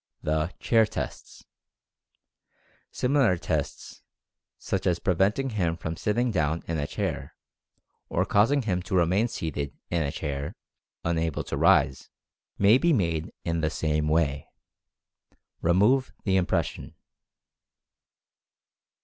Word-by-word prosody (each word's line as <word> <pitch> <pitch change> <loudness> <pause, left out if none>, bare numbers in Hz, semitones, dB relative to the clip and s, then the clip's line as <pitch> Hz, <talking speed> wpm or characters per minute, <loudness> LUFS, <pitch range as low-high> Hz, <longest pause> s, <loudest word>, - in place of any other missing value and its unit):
THE 80 +2 0
"CHAIR" 115 -2 +3
TESTS. - - -7 1.4
Similar 125 -8 +2
tests - - -4 0.6
such - - -2
as 90 -1 +2
preventing 100 +10 +1
him 85 -6 0
from 80 0 -4
sitting 120 +7 0
down 80 -3 0
in 80 -2 -2
a 75 - -2
chair; - - -4 0.7
or - - +1
causing 125 +7 +3
him 90 -5 -1
to 90 +1 -3
remain 90 +6 +3
seated 75 - -4
in 85 -1 +1
a 70 -2 -1
chair, 70 -2 -4 0.5
unable 80 -2 -1
to - - -4
rise; 65 - +3 0.5
may 105 +6 +5
be 170 +2 +3
made 85 - 0
in 85 0 0
the 80 - +1
same 75 -1 -1
way. 75 -3 +1 1.1
Remove 105 +10 +3
the 95 -3 +1
impression. 95 -2 -1
85 Hz, 115 wpm, -27 LUFS, 80-105 Hz, 1.4 s, may